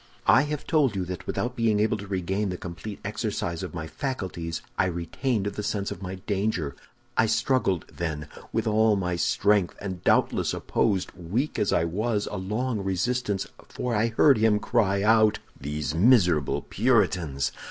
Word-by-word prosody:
I - - +6
have 150 -1 -3
told 145 -9 +2
you 95 -2 -1
that 90 0 -6
without 125 +1 -2
being 115 -3 +2
able 110 +1 +2
to 100 0 -8
regain 95 +2 -1
the 90 - -3
complete 90 +4 -7
exercise 105 -5 -2
of 95 -2 -6
my 80 -2 -4
faculties, 90 - -4
I - - +2
retained 95 - -2
the 105 0 -3
sense 100 -1 -2
of 85 - -7
my 95 0 -5
danger. 95 - -2 0.4
I 110 - +4
struggled, 105 - +1
then, 80 -3 -3 0.2
with - - 0
all 110 0 +3
my 90 -2 -1
strength, 100 +3 +2
and 95 -3 -6
doubtless - - +2
opposed, 100 -5 0
weak 95 - -2
as 105 - +1
I - - +3
was, 105 +5 -1
a - - -3
long 105 +3 -2
resistance, 100 +2 -1 0.2
for 125 -1 -3
I 110 +1 +2
heard 120 +2 +4
him 110 -1 +4
cry 105 -3 +1
out, 110 0 +5 0.2
'These 75 +1 -3
miserable 90 - +4
Puritans! 90 - +1
100 Hz, 165 wpm, -26 LUFS, 90-110 Hz, 0.4 s, I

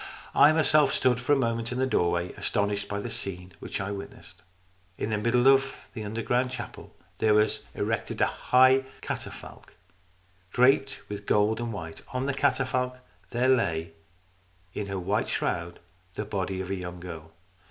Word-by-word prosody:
I 150 - +7
myself 155 -3 +4
stood 125 -2 +2
for 125 +3 -1
a - - +6
moment 115 -3 -1
in 125 - -3
the 130 - +2
doorway, 85 -7 +1
astonished 100 0 -1
by 100 - -3
the - - -5
scene 90 -1 -4
which - - -4
I 95 +1 -3
witnessed. 100 -1 -9 0.6
In 110 - -2
the 105 - +1
middle 120 +3 +3
of 135 0 +5 0.2
this 110 - -5
underground 115 +4 0
chapel 130 - -8 0.2
there 110 -1 +4
was 105 0 +3 0.2
erected - - -2
a - - +5
high 130 +1 +4 0.2
catafalque, - - -7 0.7
draped 135 +5 +3
with 105 0 -7
gold 105 +2 +3
and 120 -1 -3
white. 80 -5 -7
On 130 +1 -1
the 140 - 0
catafalque 130 -2 0 0.3
there 125 +2 +1
lay 85 -10 +1 0.8
in 105 - -4
her 100 -1 -3
white 90 - 0
shroud - - -2 0.4
the 105 - -3
body 95 -2 -2
of 95 0 -5
a - - 0
young 90 -1 -6
girl. 80 -3 -9
110 Hz, 165 wpm, -27 LUFS, 100-130 Hz, 0.8 s, I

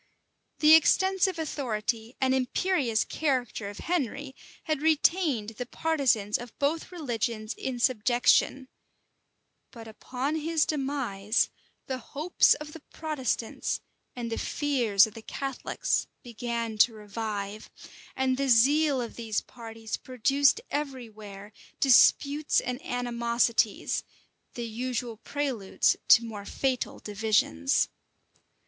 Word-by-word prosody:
The 305 0 +8
extensive 380 +3 +4
authority 235 -6 -3
and 260 -1 +2
imperious 260 -2 +1
character 250 -8 -2
of 205 - -10
Henry 285 -5 -2 0.3
had 310 -3 -2
retained 310 - +2
the 240 +2 -6
partisans 255 -11 +1
of 240 -1 -10
both 305 +5 -1
religions 235 - -3
in 260 -2 -4
subjection; 245 +2 +2 1.0
but 230 -3 -11
upon 255 +7 -3
his 320 0 +1
demise, 265 -8 -1 0.3
the 260 -1 -4
hopes 300 +8 +2
of 300 0 -9
the 325 - -9
Protestants 280 -7 -3 0.4
and 235 -2 -5
the 225 - -2
fears 240 -9 +2
of 220 - -10
the 225 - -10
Catholics 270 +3 -2 0.2
began 235 -2 -4
to 225 +1 +5
revive, 210 -1 -5 0.5
and 260 -1 +1
the 275 0 0
zeal 280 +4 +4
of 235 - -6
these 225 -3 -2
parties 225 -2 -7
produced 275 - +2
every 270 -5 -3
where 205 -1 -11 0.3
disputes 285 +3 +4
and 250 +2 -4
animosities, 235 - 0 0.5
the 240 - -4
usual 235 0 -4
preludes 255 -6 0
to 230 - +7
more 210 -3 -7
fatal 260 +2 -2
divisions. 205 - +1
245 Hz, 115 wpm, -28 LUFS, 225-285 Hz, 1.0 s, The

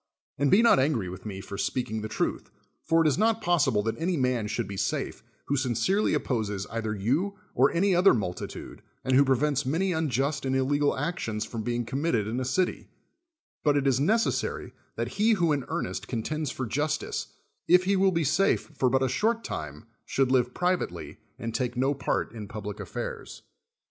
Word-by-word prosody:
And 140 0 +3
be 210 +9 +6
not 230 - +6
angry 130 -9 +1
with 95 +4 -8
me 95 -2 -6
for 100 0 -7
speaking 110 -4 -2
the 110 - -4
truth. - - -2 0.3
For 165 0 +3
it - - +3
is 150 - +1
not 225 +1 +3
possible 145 - +2
that 115 +5 -2
any 175 +1 0
man 125 -5 0
should 115 0 -2
be 100 - -6
safe, - - -2 0.2
who 140 - 0
sincerely 140 - +1
opposes 105 -8 -2
either 110 -1 -2
you 145 - 0 0.2
or 130 +3 +4
any 190 +3 +2
other 180 -2 +6
mul 95 -6 -1
titude, - - -8 0.2
and 130 - +1
who 140 - +7
prevents 140 +1 +1
many 165 +8 0
unjust 145 -3 0
and 130 0 0
ille 135 +2 +1
gal 145 -1 +2
actions 130 -8 -2
from 115 - -5
being 120 +1 -2
committed 135 -4 0
in 115 +3 -2
a 130 - -2
city; 180 +8 0 0.8
but 145 -2 +3
it 140 - 0
is 135 -2 +3
necessary 220 +10 0 0.2
that - - -2
he 220 +2 +5
who 175 -6 +2
in 140 -3 0
earnest - - -3
contends 150 +6 -2
for 130 - -4
justice, 145 +6 -2 0.4
if 180 +1 +6
he 195 +2 +2
will 190 0 +4
be 165 -2 +1
safe 165 +3 +1
for 130 -3 +2
but 135 +1 +2
a - - +2
short 220 - 0
time, 75 +1 -6 0.2
should 135 -2 0
live 125 -1 +2
privately, 180 0 -1 0.2
and 115 -1 -5
take 125 -1 -2
no 135 +3 +2
part 135 -3 -1
in 110 -3 -7
public 105 -1 -6
affairs. - - -6
135 Hz, 195 wpm, -27 LUFS, 115-165 Hz, 0.8 s, who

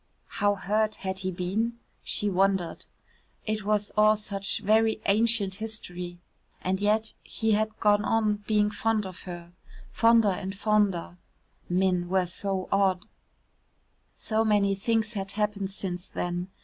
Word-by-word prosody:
How 205 0 +3
hurt 215 +2 0
had 190 -1 -4
he 185 -1 -2
been? 195 +6 -2 0.2
She 210 - 0
wondered. 190 -3 +1 0.6
It 215 -1 -2
was 210 0 0
all 215 0 +5
such 200 -2 -2
very 220 +1 +3
ancient 210 -1 +2
history. 180 -5 -4 0.5
And 190 +1 -1
yet 215 +2 +1
he 220 -1 -1
had 215 +1 0
gone 205 0 +3
on 215 -1 +1
being 210 -1 +2
fond 220 0 0
of 185 -1 -8
her. 175 -1 -8 0.4
Fonder 230 -2 +4
and 190 +1 -5
fonder 200 -5 +1 0.5
men 180 -1 +1
were 190 0 +2
so 190 +1 -3
odd. 190 -2 +2 1.1
So 220 0 0
many 205 -2 +3
things 220 +3 0
had 195 -2 -3
happened 205 -2 -1
since 185 -2 -4
then. 175 0 -3
205 Hz, 135 wpm, -27 LUFS, 190-215 Hz, 1.1 s, all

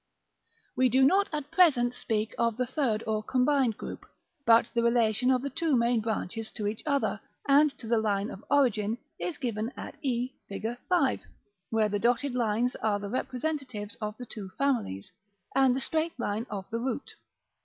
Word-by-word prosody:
We 255 0 +4
do 260 +2 +5
not 390 +7 +4
at 295 -1 -4
present 275 -9 +4
speak 220 -3 -2
of 230 -1 +1
the 250 - +1
third 240 -4 0
or 215 -1 0
combined 255 0 +2
group; - - -7 0.4
but 230 0 +7
the 235 - +2
relation 235 0 +3
of 255 -1 +3
the 280 - -3
two 315 +1 +1
main 235 0 +3
branches 220 0 -3
to 215 - -3
each 210 +1 -2
other, 280 -2 +1 0.3
and 290 +2 +6
to 235 - -9
the 230 0 +2
line 205 -1 0
of 195 - -9
origin, 230 -6 +2 0.2
is 340 -5 -3
given 230 -2 -2
at - - -7
e, 255 -1 -1 0.2
Fig. 220 +4 -3
V.; 335 -8 +2 0.5
where 220 -1 +2
the 205 0 -1
dotted 245 +4 +1
lines 240 0 +1
are 215 -2 +1
the 205 0 -6
representatives 255 -4 -3
of 210 0 -4
the 245 - -7
two 210 -4 -7
families, 240 - -1 0.4
and 265 -2 +5
the - - 0
straight 315 +1 -1
line 220 +1 -2
of 195 -2 -5
the 230 - -1
root. 260 +2 -3
240 Hz, 180 wpm, -29 LUFS, 220-265 Hz, 0.5 s, but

